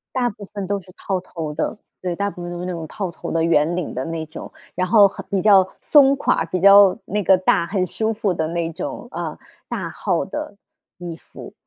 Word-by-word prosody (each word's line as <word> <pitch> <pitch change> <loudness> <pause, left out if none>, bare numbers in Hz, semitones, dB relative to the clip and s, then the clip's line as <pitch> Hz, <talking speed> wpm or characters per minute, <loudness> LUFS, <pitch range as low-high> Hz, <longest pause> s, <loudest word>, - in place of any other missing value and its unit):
大 250 -2 +2
部 205 0 -11
分 200 -1 -6
都 200 +1 -1
是 185 0 -17
套 190 -1 -2
头 165 -4 -6
的， - - -2 0.2
对， 180 -2 -2
大 200 +3 -1
部 175 - -9
分 175 - -5
都 175 0 -6
是 180 - -4
那 185 - -3
种 165 -2 -5
套 190 +3 -4
头 - - -7
的、 165 - +1
圆 165 0 +2
领 180 -4 -4
的 130 - -3
那 165 0 -4
种， 155 - -9 0.2
然 185 +1 0
后 205 0 +6
很 195 - -9
比 195 -2 +1
较 195 -3 +6
松 280 -3 +6
垮， 215 - +1
比 175 +2 -3
较 200 0 +7
那 210 +2 -1
个 190 0 +5
大， 180 -2 +2
很 190 0 0
舒 220 +5 -1
服 210 -3 -1
的 160 -2 -1
那 170 0 -2
种， - - -6
呃， - - -5 0.3
大 - - -4
号 - - -1
的 300 -3 -6 0.4
衣 175 -2 -6
服。 - - -12
185 Hz, 245 characters per minute, -21 LUFS, 170-200 Hz, 0.4 s, 较